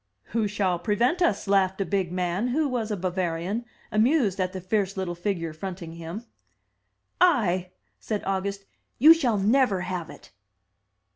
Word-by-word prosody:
' 100 - -50
"Who 220 -2 +1
shall 190 -4 0
prevent 235 - +1
us?" 215 - +1
laughed 190 -1 +2
a 195 - 0
big 190 -2 -1
man, 180 +4 -1
who 295 +5 +1
was 240 -4 -2
a 210 - -2
Bavarian, 185 +4 -2 0.3
amused 220 - +2
at 185 -1 0
the 190 - -5
fierce 195 +1 -1
little 185 -2 -2
figure 170 -2 -3
fronting 175 0 -7
him. 170 +7 -7 1.0
"I!" 190 - +3 0.3
said 215 -2 -3
August. 195 +1 -2 0.3
"You 310 +6 +9
shall 250 -10 +1
never 210 -1 +3
have 180 -2 -4
it!" - - -13
195 Hz, 155 wpm, -26 LUFS, 180-225 Hz, 1.0 s, You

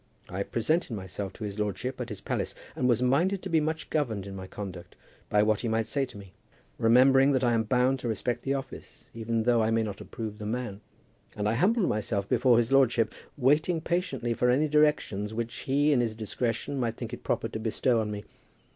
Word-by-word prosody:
I 95 +2 -3
presented 120 - 0
myself 95 0 -5
to 115 - -9
his 105 0 -5
lordship 105 +6 -2
at 120 - -4
his 105 - -7
palace, - - -3 0.2
and 125 - +1
was 120 +1 +3
minded 175 +10 +2
to 190 - -4
be 165 - +4
much 155 +1 -2
governed 115 -10 -1
in 100 -1 -7
my 95 -1 -7
conduct 95 -3 -8 0.3
by 105 0 +4
what 105 -1 +2
he 120 - -2
might 110 0 +1
say 140 +3 0
to 125 - -12
me, 100 -2 -12 0.5
remembering 135 +4 +5
that 130 -1 +1
I 120 -1 +3
am 110 -1 +1
bound 125 +3 +2
to 125 - -4
respect 115 +2 -1
the 135 +1 -1
office, 135 - -8
even 115 0 -1
though 120 0 +3
I 110 - +2
may 115 0 +2
not 105 -3 -5
approve 110 -2 -6
the 105 - -6
man; 110 -3 -3 0.5
and 105 0 -1
I 105 - +2
humbled 190 - +2
myself 105 -1 -1
before 125 -1 +4
his 115 0 +1
lordship, 120 -5 +3 0.2
waiting 150 +6 +3
patiently 160 -8 -1
for 125 +2 +1
any 140 +5 +3
directions 150 -9 +1
which 115 0 -3
he 145 +3 +1
in 125 - +3
his 115 -2 -1
discretion 115 +4 -2
might 115 -2 -1
think 120 -1 -6
it 120 - -6
proper - - -1
to 110 - -5
bestow 115 +1 +1
on 105 - -3
me. 105 -1 -5
120 Hz, 215 wpm, -28 LUFS, 110-135 Hz, 0.5 s, remembering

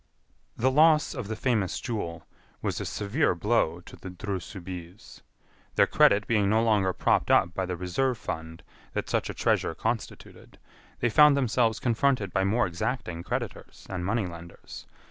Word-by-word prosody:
The 130 +3 +2
loss 155 +2 +4
of 125 -7 -5
the 110 - -3
famous 110 -5 0
jewel 85 -9 -4 0.3
was - - -3
a - - -4
severe 105 - 0
blow 90 -4 +1
to - - -13
the 95 - -9
Dreux 95 +1 -4
Soubise. 90 0 -10 0.5
Their - - +5
credit 100 +1 +4
being 105 -4 +2
no 110 +2 +3
longer 105 -4 +2
propped - - +1
up 85 - +4
by 95 0 -2
the 90 -1 -3
reserve 115 +9 -1
fund 80 -4 -6 0.3
that - - -3
such - - 0
a - - -5
treasure 80 - +1
constituted, 115 +5 -5 0.4
they 120 - +2
found 150 0 +6
themselves 120 -4 +1
confronted 120 -4 +1
by 95 - +2
more 110 +5 +2
exacting 90 -1 -3
creditors - - -5
and 90 -2 -3
money 105 +3 0
lenders. 85 -1 -10
105 Hz, 165 wpm, -27 LUFS, 90-120 Hz, 0.5 s, found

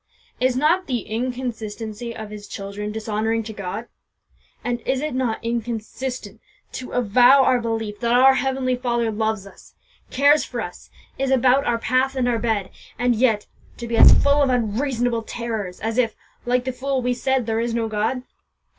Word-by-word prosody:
Is 255 0 +2
not 320 +8 +2
the 245 -4 -1
inconsistency 230 -1 -4
of 220 -1 -7
His 210 -1 -9
children 200 +1 -5
dishonouring 220 +1 -1
to 220 0 -7
God? 200 +3 -5 0.8
And 240 -1 -2
is 260 +3 -1
it 300 0 -3
not 250 -4 0
inconsistent 235 0 -4 0.3
to 255 - -7
avow 245 +3 +5
our 250 -1 +3
belief 225 -2 -3
that 235 -1 0
our 265 +2 +7
Heavenly 265 -1 0
Father 240 -2 -1
loves 220 -2 -1
us 195 - -16 0.3
cares 285 +3 +4
for - - -5
us - - -7 0.3
is 270 0 0
about 265 +1 +4
our 235 - +2
path 255 +4 +1
and 255 -2 +1
our 235 -2 +1
bed, 220 -5 -1 0.3
and 245 0 +2
yet 220 -3 +2 0.3
to 235 - -6
be 235 0 -2
as - - +9
full 285 +1 +4
of 275 - +3
unreasonable 240 0 0
terrors 220 -5 -5
as 225 +2 -1
if, 230 -3 +1 0.3
like 250 0 +2
the 260 - -2
fool, 265 0 -2
we 250 0 +1
said 260 0 0
'there 225 0 0
is 235 0 -1
no 230 -1 0
God'? 220 +4 -1
235 Hz, 175 wpm, -22 LUFS, 220-255 Hz, 0.8 s, as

